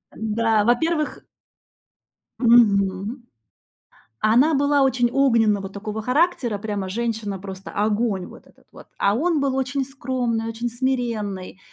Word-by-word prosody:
Да. 220 0 +1
Во-первых 305 +6 0 1.2
Мгм. 215 -1 +3 1.0
А 215 - +3
она 290 +7 +4
была 285 0 +2
очень 245 -2 +2
огненна 230 -7 +3
вот 195 0 -8
такого 215 +2 -5
характера, 250 - +1
прямо 200 -2 -4
женщина 220 -2 -3
просто 190 0 -9
огонь 210 -2 0
вот - - -14
этот - - -25
вот, - - -14
а 200 - +2
он 315 +7 +1
был 275 -1 0
очень 265 +1 -1
скромный, 250 -4 -2
очень 230 +1 -3
смиренный, 230 -7 -3
230 Hz, 130 wpm, -22 LUFS, 205-260 Hz, 1.2 s, она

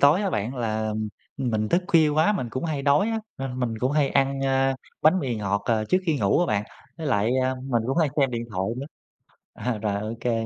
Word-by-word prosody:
tối 150 +8 +5
á 195 - 0
bạn, 110 - -2
là 110 -2 -1 0.4
mình 110 -5 -1
thức 175 - +2
khuya 165 -5 +5
quá, 155 +7 +3
mình 150 - -2
cũng 130 +6 -3
hay 155 -4 -2
đói 145 +9 +3
á, 225 - 0 0.2
nên 130 -1 -4
mình 115 -3 -1
cũng 130 +4 0
hay 145 -2 +3
ăn, 135 0 +1
a, 135 0 +2 0.3
bánh 160 +5 +5
mì 130 -8 -2
ngọt, 100 -1 -1
ờ, 110 -2 +1
trước 185 - +2
khi 155 -4 +2
ngủ 100 +5 +3
á 175 - +2
bạn. 105 -7 0 0.3
Với 160 - -4
lại, 105 -3 +2
a, 130 0 +1
mình 130 -3 -1
cũng 135 +5 0
hay 160 -3 +3
xem 140 -3 +3
điện 120 -1 -3
thoại 95 -2 -1
nữa. 135 +2 -5 0.7
À, 125 -3 -2
rồi 105 -1 -1
ô 110 +1 -3
kê. 115 -1 0
130 Hz, 240 wpm, -25 LUFS, 110-145 Hz, 0.7 s, tối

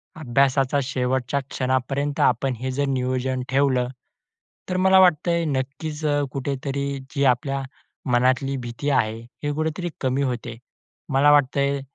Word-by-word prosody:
अभ्यासाचा 135 -1 +2
शेवटच्या 130 +1 -1
क्षणापर्यंत 135 +2 -1
आपण 130 +2 +2
हे 130 +1 -3
जर 140 +2 0
नियोजन 130 0 -1
ठेवलं, 130 -2 +2 0.8
तर 185 - 0
मला 190 +1 +5
वाटतंय 170 -1 +3
नक्कीच 145 +2 -3
अ, 145 -1 +2
कुठेतरी 140 +1 -3 0.3
जी 140 - +1
आपल्या 135 +2 +1 0.5
मनातली 130 +2 +2
भीती 120 +3 -4
आहे, 110 -5 +1 0.2
हे 145 - 0
कुठेतरी 160 +3 -2
कमी 130 +1 0
होते. 120 -3 -3 0.5
मला 140 +1 +4
वाटतं 145 -1 +3
आहे, 140 0 +1
135 Hz, 130 wpm, -23 LUFS, 130-145 Hz, 0.8 s, मला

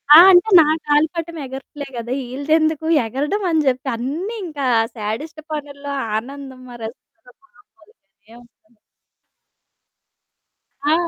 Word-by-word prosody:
ఆ! - - +12
అంటే 360 +5 +5
నా 300 - +2 0.2
గాలిపటం 320 +3 0
ఎగరట్లే 270 +2 -8
గదా! 235 +2 -3 0.2
ఈళ్ళదెందుకు 315 +3 +1 0.2
ఎగరడం 290 - -2
అని 320 -1 +3
జెప్పి 260 +1 0
అన్నీ 320 - -4
ఇంకా 295 -5 -4 0.3
సాడిస్ట్ 235 +10 -5
పనుల్లో 285 -1 -6 0.3
ఆనందం 265 +2 -8
మరసలు 245 +4 -11 0.2
మామూలుగానే 215 - -24
ఉండదు. 235 -1 -29 2.1
ఆ! 300 - +4
285 Hz, 105 wpm, -20 LUFS, 245-315 Hz, 2.1 s, ఆ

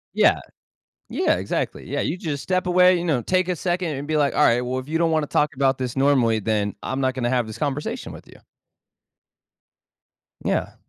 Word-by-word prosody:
Yeah. - - +4 0.7
Yeah, - - +1
exactly, - - -3
yeah, - - -1
you 170 - -1
just 150 -6 -4
step 185 0 -1
away, 180 0 +5
you 170 - -3
know, 140 -8 +1
take 185 +4 +1
a 180 - +1
second 175 0 -1
and 140 +2 -6
be, 155 - +1
like, 145 -2 +2
"All 150 - +3
right, 120 -3 +4
well, 125 +1 -2
if 130 - -12
you 165 +1 0
don't 165 -1 +2
wanna 155 -2 0
talk 150 -2 +1
about 135 -1 +1
this 125 -1 -4
normally, 130 -5 +3
then 105 -1 -1
I'm 135 +1 -3
not 130 -1 +1
gonna 120 -2 -1
have 125 -3 +1
this 110 - -8
conversation 145 -1 -3
with - - -12
you." - - -17 2.0
Yeah. - - -1
145 Hz, 205 wpm, -23 LUFS, 130-165 Hz, 2.0 s, away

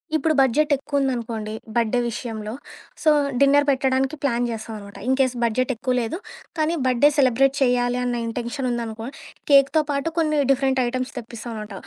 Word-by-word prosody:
ఇప్పుడు 315 0 +2
బడ్జెట్ 280 +4 +3
ఎక్కువ 280 +1 -2
ఉందనుకోండి 230 -5 -2 0.2
బర్త్ 230 -2 +1
డే 245 - +3
విషయంలో. 220 -2 -5 0.5
సో, 310 - +5 0.3
డిన్నర్ 285 +1 +5
పెట్టడానికి 265 +1 +1
ప్లాన్ 245 -3 +1
చేస్తాం 225 0 -6
అనమాట. 200 -1 -11
ఇన్‌కేస్ 260 -1 +2
బడ్జెట్ 250 +3 +1
ఎక్కువ 255 +3 -1
లేదు 230 +8 -3 0.4
కానీ, 310 +2 +1
బర్త్డే 255 +3 +4
సెలబ్రేట్ 270 +1 +3
చేయాలి 245 -1 +2
అన్న 245 -1 -1
ఇంటెన్షన్ 240 +3 -3
ఉందనుకో 230 -1 -4 0.4
కేక్‌తో 280 +3 +5
పాటు 280 +3 -1
కొన్ని 305 -2 +2
డిఫరెంట్ 265 -1 +2
ఐటెమ్స్ 255 +1 -3
తెప్పిస్తాం 235 0 -8
అనమాట. 210 -1 -10
255 Hz, 155 wpm, -23 LUFS, 235-275 Hz, 0.5 s, సో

